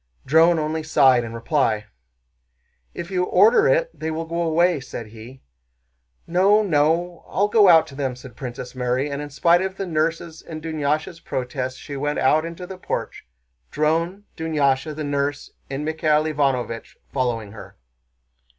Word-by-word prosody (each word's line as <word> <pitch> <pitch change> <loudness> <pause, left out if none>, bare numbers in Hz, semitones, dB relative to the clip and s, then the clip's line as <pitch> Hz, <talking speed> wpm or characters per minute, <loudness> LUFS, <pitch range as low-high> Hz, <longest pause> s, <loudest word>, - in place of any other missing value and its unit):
Dron 165 +4 +5
only 155 +1 -1
sighed 135 -5 +4
in 115 0 -7
reply. 115 -3 0 1.1
"If 170 +3 -6
you 180 -1 +1
order 215 - +5
it - - +2
they 160 - -5
will 160 +1 -3
go 170 +1 -3
away," 170 0 +2
said 120 -3 -7
he. 115 +4 -13 0.8
"No, 195 +5 +3
no. 170 0 +1
I'll 205 +2 +1
go 210 -2 +5
out 165 -2 +7
to - - -13
them," 135 -3 -2
said 125 -2 -12
Princess 125 -1 -7
Mary, 130 +3 -1
and 140 +1 -3
in 145 - -6
spite 170 +5 +3
of 190 0 -3
the 195 - -3
nurse's 165 0 -2
and 160 -2 -8
Dunyásha's 155 +1 -2
protests 130 -1 -4
she 145 - -8
went 145 +2 -2
out 155 +4 +3
into 170 +2 -7
the 185 0 -9
porch; 65 - -5 0.4
Dron, 165 +6 0
Dunyásha, 150 -2 0
the 155 - -4
nurse, 145 0 -2 0.2
and 140 +2 -4
Michael 155 -1 +1
Ivánovich 135 -7 -1 0.2
following 120 -6 -1
her. 110 - -12
155 Hz, 160 wpm, -22 LUFS, 135-170 Hz, 1.1 s, out